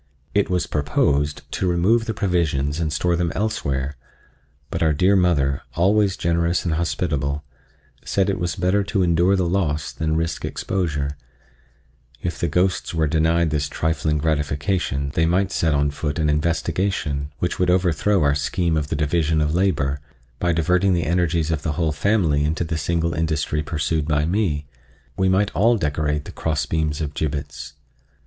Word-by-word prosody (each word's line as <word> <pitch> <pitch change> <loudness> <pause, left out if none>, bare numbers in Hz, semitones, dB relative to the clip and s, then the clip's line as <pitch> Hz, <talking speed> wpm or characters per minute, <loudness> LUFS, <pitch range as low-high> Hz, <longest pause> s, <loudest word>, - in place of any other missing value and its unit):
It 100 -1 +2
was 90 -1 +1
proposed 75 0 0
to 95 - -1
remove 100 +7 +2
the 110 - -3
provisions 80 -7 0
and 80 -2 -1
store 85 +3 +1
them 85 -1 0
elsewhere, 70 - -2 0.7
but - - -3
our 80 -2 +3
dear 95 +7 +3
mother, 75 -7 +2
always 100 +2 +2
generous 85 +1 0
and 85 - 0
hospitable, 75 -3 -1 0.6
said 95 -1 +1
it 100 0 -1
was 85 -1 -2
better 95 +2 +1
to 100 -1 0
endure 85 +3 +3
the 95 -2 +1
loss 80 -5 -1
than 80 -1 -1
risk 80 +1 -2
exposure: 75 -7 -2 1.0
if 85 +2 -4
the 85 - 0
ghosts 95 -1 0
were 80 -1 +2
denied 80 +1 +2
this 75 -1 -1
trifling 80 0 0
gratification 75 -1 -1
they 80 0 +2
might 95 +3 +1
set 80 -5 +1
on 70 0 +1
foot 75 +1 -3
an 75 -2 +2
investigation, 80 -2 -1
which 90 - -2
would 90 - +2
overthrow 90 +1 +2
our 70 -1 +3
scheme 80 +3 0
of 75 -1 -1
the - - -2
division 80 +1 +1
of 75 0 +1
labor, 75 -7 +1 0.4
by 85 - +1
diverting 90 +3 +2
the 85 -2 0
energies 85 -1 +1
of 80 -3 -1
the 80 - -2
whole 80 +1 0
family 80 -3 +1
into 80 +3 0
the 80 0 -3
single 85 +2 0
industry 80 -1 -1
pursued 75 0 -1
by 75 -1 +1
me—we 75 - -3
might 95 +2 +2
all 115 +5 +3
decorate 75 -3 -1
the - - -8
cross 80 -2 -1
beams 80 -1 -1
of 75 -1 -3
gibbets. 70 -3 -4
80 Hz, 165 wpm, -22 LUFS, 75-90 Hz, 1.0 s, our